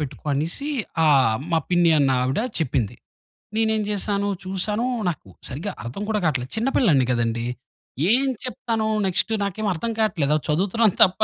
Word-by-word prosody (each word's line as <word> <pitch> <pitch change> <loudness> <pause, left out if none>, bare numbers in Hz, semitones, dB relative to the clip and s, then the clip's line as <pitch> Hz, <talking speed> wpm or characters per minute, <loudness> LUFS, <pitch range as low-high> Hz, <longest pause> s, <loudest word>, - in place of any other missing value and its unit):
పెట్టుకో" 145 0 -6
అనేసీ, 170 - -2 0.3
ఆహ్, 130 -7 +4
మా 165 - +3
పిన్ని 175 -2 +4
అన్నావిడ 130 -1 +2 0.2
చెప్పింది. 130 - -1 0.6
నేనేం 220 -1 +2
చేసాను, 205 0 0 0.2
చూసానూ, 205 +5 -1 0.2
నాకు 155 - -4 0.2
సరిగా 165 +10 -4
అర్థం 125 +13 -5
కూడా 210 -1 +1
కాట్లేదు. 130 -5 -1
చిన్నపిల్లాడిని 220 - +3
కదండీ! 115 0 -1 0.7
ఏం 270 +2 +3 0.2
చెప్తాను, 225 -2 -2 0.2
నెక్స్టు 190 +4 0
నాకేం 205 +2 -3
అర్థం 230 +8 -3
కాట్లేదు. 165 -9 +1
అలా 155 - -4
చదువుతున్నాను 195 +6 +2
తప్ప 185 +3 -2
180 Hz, 140 wpm, -23 LUFS, 140-215 Hz, 0.7 s, ఆహ్